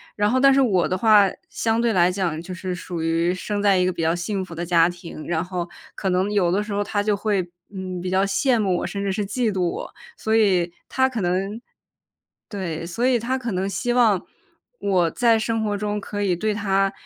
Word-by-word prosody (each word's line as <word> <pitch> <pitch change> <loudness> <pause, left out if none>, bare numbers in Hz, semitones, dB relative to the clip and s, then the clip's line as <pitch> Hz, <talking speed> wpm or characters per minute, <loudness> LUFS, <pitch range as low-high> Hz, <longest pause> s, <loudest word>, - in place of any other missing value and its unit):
然 205 0 +2
后 260 - +2
但 275 +1 +6
是 275 - +4
我 190 -9 +3
的 185 - 0
话 210 -2 +6 0.2
相 225 0 0
对 235 -2 +2
来 180 0 +4
讲 175 -4 -2
就 185 +2 -9
是 185 0 -4
属 175 -1 -5
于 165 +2 +1
生 205 +2 -3
在 200 -2 +4
一 180 - +3
个 185 - 0
比 - - -4
较 165 +1 +2
幸 190 +2 -2
福 175 - -9
的 175 +1 -3
家 170 0 +4
庭， 170 -3 -9
然 165 -1 0
后 180 -1 -4 0.3
可 190 - -2
能 185 +2 +1
有 180 -4 +2
的 200 +3 +1
时 210 -1 -6
候 205 0 0
她 205 0 -1
就 210 -1 +1
会， 200 -3 -1 0.2
嗯， 185 -2 -5
比 180 - -3
较 190 +1 +2
羡 230 +5 +2
慕 190 -4 +1
我， - - -3
甚 200 - -4
至 195 - 0
是 210 - -1
嫉 225 +3 0
妒 190 -2 -2
我。 - - -6 0.2
所 220 0 0
以 185 -6 +3 0.2
她 260 0 +2
可 240 -5 -4
能 195 +5 -1 0.9
对， 170 -5 -4
所 230 +8 -1
以 250 -2 +3
她 255 +3 -1
可 240 -4 -4
能 190 +2 -1
希 240 +6 -1
望 225 -7 +3 0.6
我 180 -4 +2
在 230 +2 +3
生 225 0 -1
活 205 -1 -1
中 210 0 -2
可 205 +1 -4
以 190 -3 +2
对 215 +5 -1
她， 195 -2 +1
195 Hz, 250 characters per minute, -23 LUFS, 180-215 Hz, 0.9 s, 但